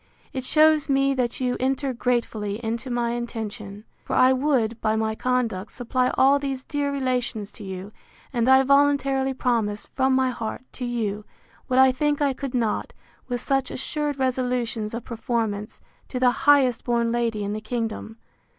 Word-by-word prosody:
It 260 - -3
shews 310 +2 +4
me 275 0 +3
that 250 -3 -1
you 250 -1 0
enter 270 +1 0
gratefully 230 -4 -1
into 230 +3 -3
my 240 -1 0
intention. 220 -3 -5 0.2
For - - -3
I 255 +1 +6
would, 255 -5 0
by 215 0 +1
my 220 0 0
conduct, 230 -5 -1
supply 250 +1 0
all 275 +2 +5
these 270 -2 -3
dear 285 0 -2
relations 250 -6 -2
to 215 - -11
you; 190 +1 -7 0.4
and 240 0 +2
I 265 0 +7
voluntarily 275 -1 +3
promise, 225 -5 0
from 265 0 +2
my 260 -1 +2
heart, 225 0 -5
to 250 - -5
you, 215 -4 -2 0.4
what 255 - 0
I 265 0 +7
think 290 +3 0
I 285 -2 +2
could 265 -1 -5
not, 225 -4 -1 0.3
with 245 -1 -2
such 270 -1 0
assured 295 +1 -3
resolutions 250 -4 -1
of 235 - -5
performance, 225 -3 -3 0.3
to 255 - -4
the 250 -1 +5
highest 265 -3 +3
born 235 -1 +1
lady 230 -3 0
in 200 +1 -2
the 215 - -4
kingdom. 225 -1 -4
245 Hz, 170 wpm, -24 LUFS, 225-265 Hz, 0.4 s, I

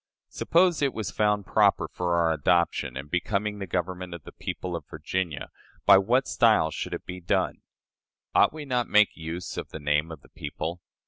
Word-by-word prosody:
Suppose 175 -1 +2
it 140 -2 +1
was 105 -5 -3
found 105 -1 +1
proper - - +3
for 90 -1 -1
our 85 -1 +3
adoption, 85 -1 +1
and 70 +2 -6
becoming 100 +5 -1
the 95 - -5
government 90 0 -3
of 85 - -11
the - - -11
people 90 -1 -5
of 85 - -7
Virginia, 80 0 -3 0.3
by 95 - +8
what 125 +7 +2
style 110 -10 +3
should - - -4
it - - -9
be 90 0 -6
done? 85 - 0 0.7
Ought - - +5
we 155 -1 -8
not 125 -3 0
to - - -20
make 105 -1 +4
use 85 +2 -6
of - - -5
the - - -7
name 75 +2 0
of 80 -3 -9
the - - -19
people? 80 +4 -5
90 Hz, 195 wpm, -27 LUFS, 80-105 Hz, 0.7 s, by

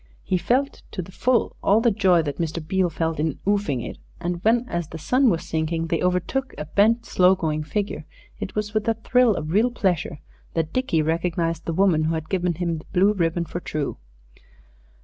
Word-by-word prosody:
He 185 - 0
felt 270 +8 0
to 185 - -3
the 185 - -12
full 245 +4 +1
all 205 +3 +4
the 235 0 +3
joy 190 -5 +3
that 145 -2 -4
Mr. 165 -1 -2
Beale 190 0 +2
felt 160 -1 -2
in 155 -2 -1
"'oofing 200 - 0
it," - - -8 0.2
and 175 0 -3
when 235 +3 +3
as 170 -7 -3
the 160 - -8
sun 255 - +3
was 170 -5 -1
sinking 165 +1 -1
they 165 0 -1
overtook 180 +9 -1
a 150 - -4
bent, 220 +8 +2
slow 185 -2 +4
going 155 -4 -1
figure, 205 +7 -3 0.3
it - - -5
was 210 0 -2
with 215 0 0
a 225 - +2
thrill 235 0 +3
of 155 -1 -4
real 215 +7 +3
pleasure 185 -11 -1 0.4
that 160 -1 -1
Dickie 210 -12 +1
recognized 165 0 -1
the 165 - -2
woman 170 -3 +3
who 160 +1 0
had 160 -1 -5
given 180 -3 0
him 170 -1 -2
the - - -14
blue 195 +3 +4
ribbon 170 -2 0
for 175 - -5
True. 155 -4 -4
180 Hz, 205 wpm, -24 LUFS, 160-210 Hz, 0.4 s, all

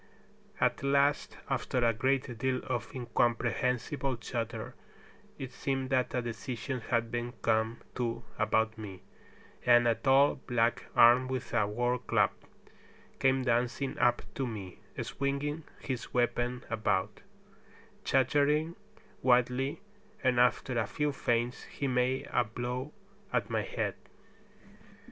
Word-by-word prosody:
At - - +2
last, 140 +1 +2
after 125 -2 0
a 115 - +4
great 125 0 0
deal 130 0 0
of 120 -4 -3
incomprehensible 125 +2 0
chatter, 115 0 -4 0.6
it 130 -2 -6
seemed 135 -1 -2
that 130 -1 +1
a 125 - 0
decision 120 +3 -4
had 115 -1 +1
been 120 0 -3
come 110 0 +1
to 120 -1 -2 0.2
about 110 0 +1
me, 95 -4 -8 0.6
and 120 -1 +6
a 115 - +5
tall 135 +3 +4
black 120 -1 +1
armed 120 +2 +7
with 130 -2 -4
a 110 -4 +3
war 120 +4 0
club - - +2 0.9
came 135 0 +3
dancing 125 +2 0
up 120 - +3
to 135 -2 -2
me, 100 -6 -7 0.2
swinging 145 +3 -2
his 130 -3 -4
weapon 125 0 0
about, 105 -2 0 0.8
chattering 145 +5 +2 0.5
wildly, 125 +3 +2 0.4
and 125 -2 +3
after 125 0 +2
a 110 - 0
few 150 +8 0
feints 120 -2 -1
he 140 - -4
made 125 +1 +1
a 120 - +4
blow 125 +5 -4 0.4
at - - 0
my - - +1
head. - - -2
125 Hz, 125 wpm, -31 LUFS, 115-130 Hz, 0.9 s, armed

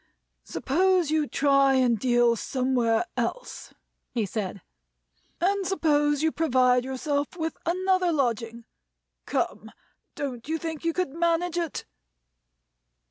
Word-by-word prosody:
"Suppose 355 +2 +1
you 310 -2 +1
try 275 -1 +3
and 245 -4 +2
deal 240 0 +3
somewhere 250 +1 0
else," - - -4 0.4
he 230 -3 -1
said. 200 -1 -4 0.8
"And 385 +2 +1
suppose 295 -5 +2
you 320 - +3
provide 255 -6 +3
yourself 285 +4 -2
with 320 -1 -3
another 370 0 +2
lodging. 235 -5 -1 0.6
Come! - - -2 0.4
Don't 255 -4 -5
you 325 - 0
think 320 -1 -5
you 335 - +1
could 365 -6 -1
manage 340 +1 0
it?" 335 -4 -4
290 Hz, 115 wpm, -26 LUFS, 250-335 Hz, 0.8 s, try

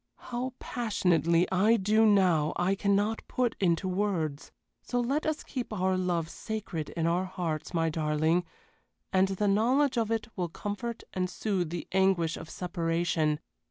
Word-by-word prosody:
How 250 +1 -4
passionately 175 - +1
I 210 +5 +4
do 215 +2 +4
now 180 -7 +3
I 180 +2 +1
cannot 200 +3 +1
put 250 -2 0
into 180 0 +1
words. 180 -7 -1 0.3
So 245 - -2
let 275 +6 0
us 310 -1 -1
keep 250 -4 -5
our 190 -2 +1
love 175 -3 0
sacred 195 -5 -5
in 165 - +1
our 175 +3 +1
hearts, 170 -5 -3
my 165 -2 +1
darling, 155 +2 +1 0.7
and 190 0 +4
the 195 +2 -1
knowledge 245 +6 +3
of 225 -2 0
it 225 -1 -1
will 180 -3 -2
comfort 210 +6 -5
and 185 -1 -1
soothe 185 -4 -1
the 170 0 -5
anguish 190 -4 +2
of 165 - -9
separation. 165 -3 0
185 Hz, 155 wpm, -29 LUFS, 170-215 Hz, 0.7 s, I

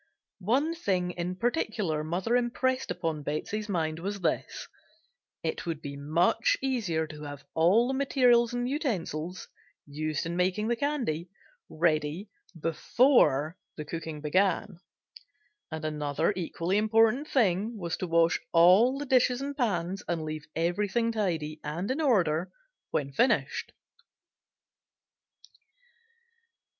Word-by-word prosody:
One 260 - +1
thing 185 - -1
in 180 +1 -4
particular 210 - -1
mother 180 +9 -1
impressed 255 +2 0
upon 160 -3 -2
Betsey's 205 +9 -3
mind 160 -4 -1
was 200 +3 -4
this: 170 - -2 0.8
it - - -3
would 165 -3 -2
be 140 -2 -7
much 160 +10 +2
easier 215 -12 -1
to 150 -1 -10
have 145 -1 -8
all 185 +9 +4
the 265 - -1
materials 250 -3 +3
and 245 0 -2
utensils, 185 - -3 0.4
used 150 +1 -3
in 170 +1 -3
making 185 +5 0
the 240 - +2
candy, 235 - -2 0.4
ready, 155 +4 0 0.3
before 165 - +3 0.2
the 150 - -5
cooking 160 -1 -6
began; 185 +3 +1 0.9
and 160 -1 -5
another 150 +3 0
equally 180 +2 -1
important 225 +6 +3
thing 215 - +1
was 170 -4 -3
to 185 - -3
wash 165 0 +3
all 185 +10 +6
the 290 - -4
dishes 250 -2 +3
and 280 +1 -4
pans 195 - -1
and 170 -2 -1
leave 155 0 -6
everything 205 +7 0
tidy 165 -8 -2
and 170 +9 -3
in 285 +5 -1
order 180 - +2 0.4
when 140 -1 -2
finished. 240 - +1
180 Hz, 125 wpm, -28 LUFS, 160-235 Hz, 0.9 s, all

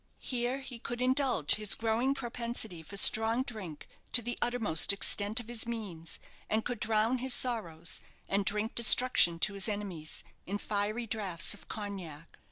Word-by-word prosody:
Here 250 +1 -3
he 255 -3 -9
could 240 +1 -6
indulge 255 - +1
his 210 -2 +3
growing 230 +4 -1
propensity 235 -7 -4
for 200 +6 -5
strong 225 +4 +4
drink 195 - -9 0.3
to 240 - +9
the 240 +2 -4
uttermost 225 -9 +2
extent 205 +2 +1
of 235 - -10
his 235 -1 -4
means, 195 -9 -7 0.3
and 220 +1 -1
could 245 -3 -4
drown 225 +3 0
his 260 0 +3
sorrows, 175 -10 +1 0.3
and 200 +1 -1
drink 210 +2 -2
destruction 235 -7 +6
to 200 +4 0
his 200 +2 -1
enemies, 195 -7 -4 0.2
in 200 +2 -3
fiery 210 +3 -3
draughts 200 -6 -1
of 205 - -13
cognac. 185 -7 -9
220 Hz, 160 wpm, -30 LUFS, 195-240 Hz, 0.3 s, to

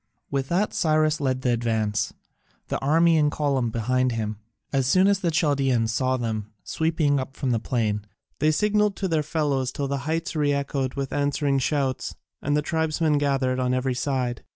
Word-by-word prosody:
With 135 -1 -1
that 190 +5 +1
Cyrus 155 -2 +2
led 130 -2 -1
the 125 - +2
advance, 110 -3 0 0.6
the - - -1
army 165 +4 +4
in 150 -1 +3
column 140 -5 0
behind 125 +3 0
him. 110 -2 -3 0.4
As 135 -2 +2
soon 185 +7 +4
as 200 -1 +3
the 180 -4 0
Chaldaeans 135 -8 +1
saw 130 +1 +1
them 110 -3 -3
sweeping 160 -3 +1
up 135 +1 -6
from 130 - -1
the 115 - +1
plain, 110 -4 -1 0.3
they 155 - +3
signalled 210 +5 +2
to 195 - -2
their 160 -3 +1
fellows 145 -4 -1
till 140 +1 -3
the 140 0 -2
heights 165 +2 -2
re 145 -2 +2
echoed 140 -2 -2
with 135 -1 -3
answering 145 -1 +1
shouts, 135 -2 -1 0.3
and 145 +1 +1
the 150 - 0
tribesmen 160 -1 +1
gathered 135 -3 +1
on 125 0 +1
every 130 0 0
side. 125 -2 -2
140 Hz, 180 wpm, -25 LUFS, 125-155 Hz, 0.6 s, army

